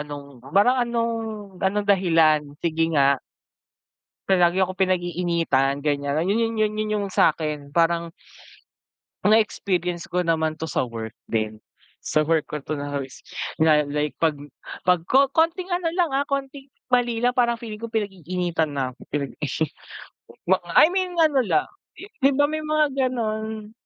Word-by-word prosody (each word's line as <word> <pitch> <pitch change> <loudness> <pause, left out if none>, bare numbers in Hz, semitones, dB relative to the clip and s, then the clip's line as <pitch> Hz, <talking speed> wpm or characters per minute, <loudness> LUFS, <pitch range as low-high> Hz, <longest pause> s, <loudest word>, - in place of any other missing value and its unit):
anong 145 -1 -7 0.3
parang 210 +7 +4
anong 235 -1 0 0.5
anong 200 +2 0
dahilan, 165 -6 +4 0.2
sige 165 0 +1
nga? 140 -1 +4 1.1
Palagi 180 -2 +4
akong 185 0 -1
pinag-iinitan 170 -6 0
gan'yan, 145 -1 0
yun 200 +4 +1
yun 230 0 0
yun 215 -1 +1
yun 215 0 -1
yung 200 - -2
sa'kin 150 -4 +1
parang, 170 0 +2 1.1
na-experience 185 -5 +1
ko 180 0 +1
naman 160 -1 0
to 160 - -4
sa - - 0
work 115 -2 -7 0.2
din. 110 -1 -1 0.4
Sa 155 - +1
work 160 -1 +1
ko 150 -1 -5
'to 155 +1 -4
na 145 0 -5
is 130 - -11 0.4
na 155 -1 +5
like 150 +1 -2
'pag 155 -3 +2 0.5
'pag 180 -2 +3
ko 275 +2 +6
konting 330 +3 +2
ano 350 -2 -1
lang, 350 -1 +1
ah, 275 - +2
konting 275 0 -4 0.2
mali 245 -2 +2
lang 245 +1 +2
parang 235 -1 +2
feeling 220 -2 -8
ko 230 - -5
pinag-iinitan 180 -6 -2
na 130 -2 -2
ako, - - -40
pinag-ini 145 +1 -2 1.1
I - - +8
mean 370 -1 -1
ano 310 -4 +4
lang, 170 -10 +1 0.3
di - - -10 0.2
'di 270 - +6
ba 290 +1 +4
may 310 0 -2
mga 305 0 +2 0.2
gano'n, 220 -3 -4
180 Hz, 150 wpm, -23 LUFS, 155-230 Hz, 1.1 s, I